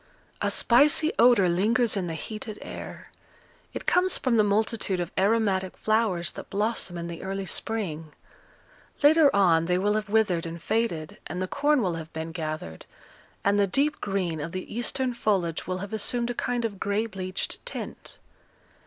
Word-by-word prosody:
A - - +1
spicy 295 +6 +4
odour 230 -5 +6
lingers 215 +7 +2
in 190 -3 -2
the 165 - -4
heated 215 +5 -6
air; - - -9 0.6
it - - -7
comes 365 +1 +4
from 255 -3 0
the 215 - +5
multitude 205 -2 0
of 175 0 -3
aromatic 195 -2 +1
flowers 215 -6 0
that - - -10
blossom 205 -3 -1
in 170 0 -5
the 170 -1 -7
early 195 0 -4
spring. 175 -8 -2 0.9
Later 305 0 +7
on 170 -6 +3
they 180 0 +2
will 205 +3 +1
have 215 -1 -2
withered 200 -6 +1
and 165 +1 -7
faded, 170 -5 -2
and 175 - -5
the 185 - -2
corn 290 +2 +2
will 180 -3 0
have 160 - -12
been 160 +1 -5
gathered, 155 - -6 0.6
and 200 +1 +3
the 200 - +3
deep 285 +10 +1
green 185 -5 -2
of 165 +3 -6
the 185 +3 -6
eastern 250 +2 -1
foliage 190 -8 -1
will 185 0 -2
have 200 +3 -7
assumed 235 +3 +1
a - - -3
kind 240 0 -2
of 200 -4 -4
gray 205 +2 0
bleached 185 -3 -5
tint. - - -6
200 Hz, 170 wpm, -26 LUFS, 175-230 Hz, 0.9 s, Later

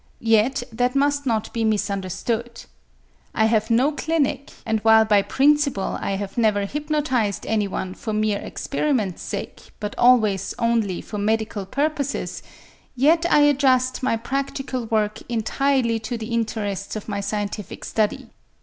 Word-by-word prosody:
Yet 235 +4 +3
that 245 +3 0
must 285 0 +1
not 220 -2 -1
be 230 - -1
misunderstood. 215 +3 -2 0.7
I 220 - +3
have 220 -1 +2
no 250 +6 +3
clinic, 300 -2 -1 0.2
and 220 -1 0
while 220 0 +5
by 210 -2 +4
principle 280 -3 +1
I - - -1
have 195 +3 -4
never 210 -3 +2
hypnotized 285 -6 -1
anyone 200 -3 -1
for 220 - -5
mere 215 -1 0
experiment's 255 - -2
sake - - -6
but 210 -1 -4
always 220 -6 +3
only 230 -6 0
for 210 - -6
medical 215 -1 -1
purposes, 285 +3 -2 0.5
yet 325 +6 +3
I 295 - +6
adjust 260 -3 +3
my 255 -3 +1
practical 270 0 -3
work 215 -1 0
entirely 235 +1 +1
to 230 +2 -4
the 225 +1 -6
interests 210 -4 -2
of 215 - -6
my 205 -2 -2
scientific 205 -1 -4
study. 215 -2 -1
225 Hz, 140 wpm, -23 LUFS, 210-270 Hz, 0.7 s, I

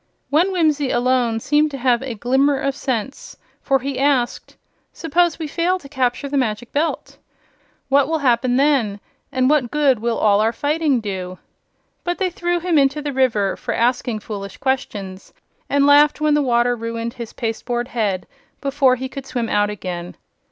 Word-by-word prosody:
One 340 +6 +3
Whimsie 305 -6 +1
alone 245 -2 +1
seemed 295 +5 +2
to 280 - -6
have 245 -2 +2
a 260 -3 -5
glimmer 265 +5 +2
of 275 0 -1
sense, 265 -2 -4 0.2
for 275 - +2
he 270 0 -4
asked: 270 -4 0 0.3
"Suppose 335 +1 +1
we 325 - -4
fail 340 +5 0
to 295 - -13
capture 260 -1 -1
the 280 0 -2
Magic 230 -1 -2
Belt? 310 +3 -2 0.7
What 275 0 +3
will 320 +1 0
happen 250 -3 +2
then, 260 -7 +2 0.3
and 255 0 +1
what 280 -4 +2
good 285 -4 +2
will 230 +1 -1
all 205 -1 +3
our 225 +2 +1
fighting 290 0 0
do?" 185 -3 -5 0.7
But 350 0 -2
they 380 -2 -1
threw 350 -2 -1
him 340 -3 +2
into 275 +2 +2
the 290 -1 -4
river 225 -7 +1
for - - -4
asking 240 -2 0
foolish 200 -2 -7
questions, 205 -8 -3 0.4
and 280 0 +3
laughed 290 +1 +5
when 305 -1 +2
the 295 - +3
water 245 -2 +2
ruined 230 0 -4
his 235 -3 -8
pasteboard 240 +1 -3
head 205 -8 -1 0.3
before 275 -2 +2
he 260 +1 -5
could 270 0 -8
swim 235 -4 -2
out 205 0 +2
again. 180 -4 -6
260 Hz, 175 wpm, -20 LUFS, 230-290 Hz, 0.7 s, laughed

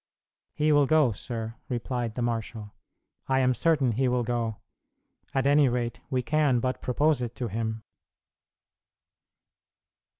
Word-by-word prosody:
"He 155 +1 +2
will 145 -2 +4
go, 155 -5 +4
sir," 115 +2 -6
replied 120 -2 -3
the 125 - -2
marshal; 115 -2 -4 0.6
"I 135 - +3
am 130 -1 +3
certain 145 -3 +2
he 130 +4 +1
will 125 0 +1
go: 115 -2 -2 0.7
at 135 -1 0
any 145 -1 +5
rate 120 -1 -2
we 130 -1 0
can 150 -3 +2
but 130 +2 -2
propose 145 +2 +1
it 120 -1 -4
to 120 -3 -3
him." 110 +1 -3
125 Hz, 135 wpm, -27 LUFS, 115-135 Hz, 0.7 s, any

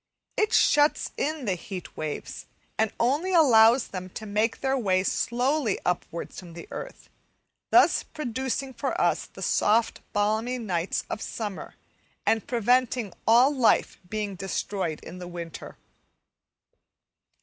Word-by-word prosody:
It 430 0 +1
shuts 295 +1 +3
in 305 -3 -2
the 195 - +1
heat 180 0 -8
waves, 155 -1 -5 0.3
and 220 -1 +1
only 295 +10 +1
allows 240 -5 +6
them 185 -1 -6
to 220 - -6
make 215 +2 0
their 270 0 +1
way 190 -7 +1
slowly 245 +3 0
upwards 175 -1 -3
from 175 -2 -11
the 170 - -9
earth - - -8 0.6
thus - - +5
producing 265 -1 -4
for 260 +3 -3
us - - +1
the - - -9
soft, 220 +2 +2
balmy 220 +4 0
nights 185 -7 -2
of 215 - -5
summer 210 -4 -5 0.5
and 225 -1 +1
preventing 245 -3 +1
all 245 +6 +6
life 250 -4 +2
being 210 -1 -3
destroyed 190 -2 -3
in 180 - -9
the 180 - -7
winter. 170 -2 -8
220 Hz, 130 wpm, -26 LUFS, 190-255 Hz, 0.6 s, allows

